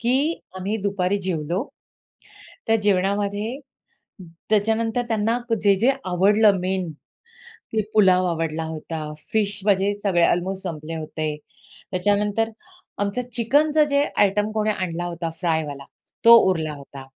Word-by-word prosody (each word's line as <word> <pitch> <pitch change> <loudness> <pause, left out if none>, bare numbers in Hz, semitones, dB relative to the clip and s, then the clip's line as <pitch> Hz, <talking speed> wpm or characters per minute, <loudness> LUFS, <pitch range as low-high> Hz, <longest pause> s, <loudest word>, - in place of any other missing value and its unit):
की 240 +2 +1 0.4
आम्ही 195 +4 -2
दुपारी 200 -1 0
जेवलो. 170 -2 -2 1.1
त्या 225 - +4
जेवणामध्ये 205 +4 0 0.9
त्याच्यानंतर 225 +2 +1
त्यांना 225 +1 +1 0.2
जे-जे 205 +4 +4 0.2
आवडलं 200 +3 +4
मेन, 185 -2 -2 0.6
ते 225 - -4
पुलाव 185 -3 +5
आवडला 165 -1 -2
होता, 160 0 -5 0.3
फिश 205 -2 0
म्हणजे 200 0 +3
सगळे 180 -4 +2
अल्मोस्ट 190 +2 0
संपले 165 -2 -5
होते. 155 -1 -4 0.6
त्याच्यानंतर 205 +4 +1 0.5
आमचं 205 +4 -1
चिकनचं 295 +6 +3
जे 280 0 +3
आयटम 205 +1 +2
कोणी 215 0 0
आणला 175 -4 -2
होता 170 -1 -4
फ्रायवाला, 155 -5 -2 0.4
तो 235 0 +11
उरला 160 -4 -1
होता. 140 -1 -11
195 Hz, 115 wpm, -23 LUFS, 170-215 Hz, 1.1 s, तो